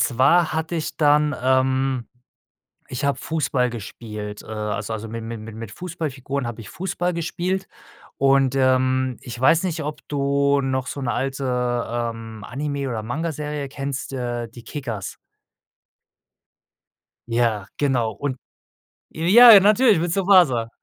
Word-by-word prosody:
zwar 160 +8 +3
hatte 160 +2 -2
ich 160 -2 -3
dann, 150 -1 +4
ähm 130 -1 +1 0.8
ich 125 +3 -3
habe 140 -2 +1
Fußball 135 -4 0
gespielt, 105 -2 -7
äh - - -16
also 105 0 -4
also 110 0 -5
mi 115 +1 -6
mi 115 0 -6
mi 110 +1 -9
mit 110 -1 -8
Fußballfiguren 140 -5 -4
habe 120 -1 -5
ich 105 - -11
Fußball 180 -1 -2
gespielt. 180 +3 -2 0.5
Und, 135 -1 +3
ähm, 130 -1 +2
ich 120 -1 -8
weiß 160 +6 +4
nicht, 165 -4 -2
ob 150 0 -6
du 140 0 +1
noch 130 -1 -1
so 140 - -5
'ne 120 - -1
alte, 135 +4 -2 0.5
ähm, 115 -2 -4
Anime 140 +1 -3
oder 115 -4 -3
Mangaserie 150 +2 -3
kennst, 135 -1 -5
äh, 120 -2 -3
die 120 +1 -13
Kickers. 115 -10 -6 2.1
Ja, 115 -4 0
genau 130 -6 +1
und 135 +3 -4 0.7
ja, 210 +7 +8
natürlich 210 0 +4
mit 170 +1 -1
Tsubasa. 175 - +4
135 Hz, 135 wpm, -22 LUFS, 120-155 Hz, 2.1 s, ja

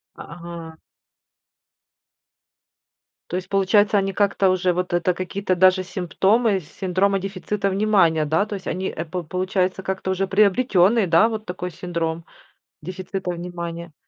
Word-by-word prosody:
А, - - -10
ага. 170 -1 -9 2.5
То - - -3
есть, 185 0 -4
получается, 205 +2 +3
они 195 0 -1
как-то 200 -1 +2
уже 185 -1 +1
вот 180 +1 -2
это 175 +1 +1
какие-то 185 +1 -2
даже 185 +1 +4
симптомы 195 +4 +1
синдрома 190 +4 0
дефицита 195 +1 -3
внимания, 190 -6 +2
да, 160 +8 +1
то 210 - -4
есть, 190 -1 -9
они 190 +1 -2
эп 170 +1 -5
получается, 185 0 -1
как-то 190 0 -3
уже 190 +1 0
приобретенный, 205 +1 +3
да, 175 +6 +4
вот 220 -1 -5
такой 180 -1 -5
синдром 170 -2 -4 0.6
дефицита 185 +2 -5
внимания. 170 -1 -6
185 Hz, 130 wpm, -22 LUFS, 175-195 Hz, 2.5 s, даже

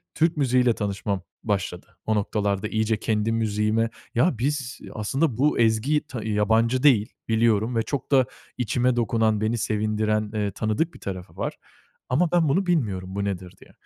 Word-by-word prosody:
Türk 165 0 +2
müziği 130 -3 +3
ile 120 -2 +4
tanışmam 100 -1 -2 0.2
başladı 95 -4 -3
o 110 - +1
noktalarda. 100 0 0
İyice 110 0 0
kendi 110 0 0
müziğime 110 0 +1 0.3
"Ya, 125 +3 +3
biz 135 +1 -2
aslında 125 +5 0
bu 145 +1 +2
ezgiyi 115 +7 +3
t 120 -7 -7
yabancı 110 +4 +2
değil, 120 -7 +4
biliyorum 115 0 +2
ve 115 - +3
çok 135 +4 -4
da 130 -2 +5 0.3
içime 125 +1 +1
dokunan, 110 -2 +1
beni 110 +2 +1
sevindiren, 110 -1 0
ııı, 105 -2 -1
tanıdık 110 - -1
bir - - -13
tarafı 95 -2 -7
var - - -2 0.6
ama 160 +6 +2
ben 170 -4 +3
bunu 190 +8 +2
bilmiyorum, 100 - -1
bu 100 - -1
nedir 95 -2 -4
diye." - - -16
110 Hz, 165 wpm, -25 LUFS, 105-125 Hz, 0.6 s, da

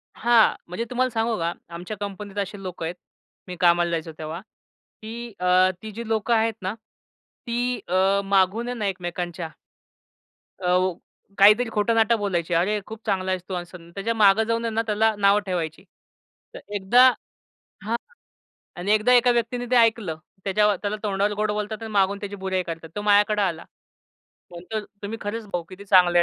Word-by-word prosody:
हां, 235 -1 +4
म्हणजे 205 +7 -4
तुम्हाला 255 +1 +1
सांगू 225 -1 -1
का 165 +1 0 0.2
आमच्या 180 +5 -6
कंपनीत 205 0 -7
असे 200 0 -3
लोक 180 -2 -6
आहेत. 170 +2 -3 0.5
मी 180 - -6
कामाला 175 -1 +4
जायचो 160 -1 -3
तेव्हा 160 +2 -5 0.6
की 230 +1 -7
अ, 180 +1 +4
ती 220 -1 -7
जी 230 +2 -7
लोकं 225 +1 +1
आहेत 225 0 +2
ना, 190 +2 -2 0.7
ती 245 +1 -1
अ, 190 +2 +2
मागून 195 +4 +2
आहे 245 - -3
ना 210 - -2
एकमेकांच्या 175 -2 -4 1.1
अ, 180 0 +2 0.4
काहीतरी 210 +4 +6
खोटं-नाटं 225 +1 +2
बोलायची. 175 -4 -1
अरे, 200 +5 +2
खूप 220 +1 -10
चांगला 190 -2 0
आहेस 185 -1 -1
तू, - - -4
असं. 175 -1 -8
त्याच्या 220 +4 -1
मागे 215 0 +5
जाऊन 230 0 -1
आहे 225 - -2
ना, 225 - +1
त्याला 220 +1 +2
नाव 200 +1 +4
ठेवायची. 170 -1 -3 0.7
तर - - -8 0.2
एकदा 240 +7 +6 0.8
हां, 230 +2 0 0.8
आणि 185 +4 0
एकदा 215 +4 +4
एका 245 0 +5
व्यक्तीनी 240 +1 -1
ते 250 - +4
ऐकलं. 225 -8 +3 0.3
त्याच्यावर 205 +1 +2
त्याला 205 +1 -1
तोंडावर 200 0 0
गोड 210 0 0
बोलतात 210 +1 -4
आणि 220 - -6
मागून 200 0 +2
त्याची 205 0 -6
बुराई 190 -1 -1
करतात. 165 -1 -7
तो 205 - -2
माझ्याकडे 210 0 +4
आला. 170 -4 -1 0.9
म्हणतो 180 +5 -5 0.2
तुम्ही 220 +3 -5
खरंच 215 +2 -4
भाऊ 175 -1 -1
किती 190 +2 -11
चांगले 180 -3 +5
205 Hz, 165 wpm, -24 LUFS, 185-225 Hz, 1.1 s, काहीतरी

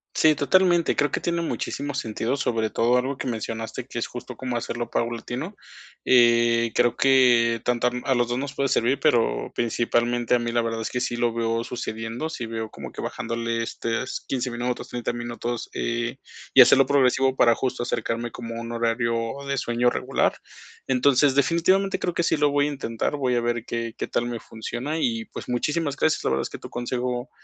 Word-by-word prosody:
Sí, 155 -1 +5
totalmente. 175 +2 +3
Creo 145 -2 +1
que - - -1
tiene 170 0 -1
muchísimo 145 -3 -3
sentido, 115 0 -2
sobre 115 -5 0
todo 120 +2 +3
algo 130 +2 -1
que - - -4
mencionaste 115 -1 -4
que - - -5
es - - -2
justo - - -8
cómo 125 -2 -3
hacerlo 120 0 -4
paulatino. 120 - -3 0.5
Eh, 120 -1 +4
creo 120 -1 +3
que 120 -4 +4
tanto 125 0 +1
a - - +1 0.2
a - - +4
los 120 -1 +2
2 120 +1 -1
nos 140 +1 -4
puede 135 -1 0
servir, 125 +4 +2
pero 120 -7 +2
principalmente 120 0 0
a - - +2
mí 120 0 -2
la 120 0 +2
verdad 115 0 -2
es - - -3
que 125 - -2
sí 125 -1 -1
lo 120 -1 +1
veo 115 0 0
sucediendo, 115 +3 -4
sí 120 -8 -5
veo 110 -1 -4
como - - -8
que - - -7
bajándole 115 0 -2
estos 115 +2 -3
15 125 -1 -1
minutos, 120 +1 -3
30 120 -1 -3
minutos, 120 0 -4
eh, 120 +2 -2 0.4
y 130 - +11
hacerlo 135 +2 +7
progresivo 135 -1 +3
para 120 -2 +5
justo, 125 -2 -2
acercarme 120 0 -2
como 115 -1 -7
a - - -4
un 115 0 -6
horario 115 0 0 0.3
de 140 0 -1
sueño 120 0 +2
regular. - - 0 0.5
Entonces, 135 +1 +3
definitivamente 170 +7 +2
creo 175 - -1
que 170 - +1
sí - - +2
lo 145 -1 +3
voy 145 0 +2
a 150 - 0
intentar, 115 -1 -2
voy 130 -3 0
a 120 - +2
ver 120 -1 -1
qué 115 -1 -3
qué - - -3
tal 120 - -1
me 120 -1 -4
funciona 120 +8 -5
y, 115 -5 0
pues, - - -9
muchísimas 145 +4 -1
gracias. 160 +1 +1
La - - +1
verdad 65 - +1
es - - -4
que - - -7
tu - - -10
consejo 125 +1 -3
120 Hz, 200 wpm, -24 LUFS, 115-135 Hz, 0.5 s, y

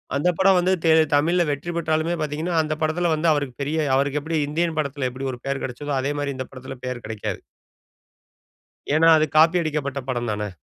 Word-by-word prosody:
அந்த 145 +6 +2
படம் 190 -1 +5
வந்து 180 +1 +1
தே 160 - +5 0.2
தமிழில 170 +5 +3
வெற்றி 145 +5 -4
பெற்றாலுமே 160 +1 0
பார்த்தீங்கனா, 155 +3 -2
அந்த 155 0 -2
படத்தில 165 +2 +1
வந்து 155 +2 0
அவருக்கு 140 -4 -2
பெரிய 150 +3 -2 0.2
அவருக்கு 140 +2 +1
எப்படி 160 +2 -2
இந்தியன் 160 +2 -1
படத்தில 140 -3 -2
எப்படி 135 +2 -5
ஒரு 125 - -8
பெயர் 135 0 -2
கெடச்சதோ, 145 +3 -4
அதே 140 +2 -1
மாரி 140 -1 -2
இந்த 130 - -5
படத்தில 130 0 -9
பெயர் 125 -2 -5
கெடைக்காது. 110 -1 -5 1.5
ஏனா, 160 +2 +5
அது 155 - +2
காப்பி 165 +3 +5
அடிக்கப்பட்ட 145 -3 -2
படம் 120 -2 -2
தானே. 105 0 -3
150 Hz, 185 wpm, -23 LUFS, 135-160 Hz, 1.5 s, படம்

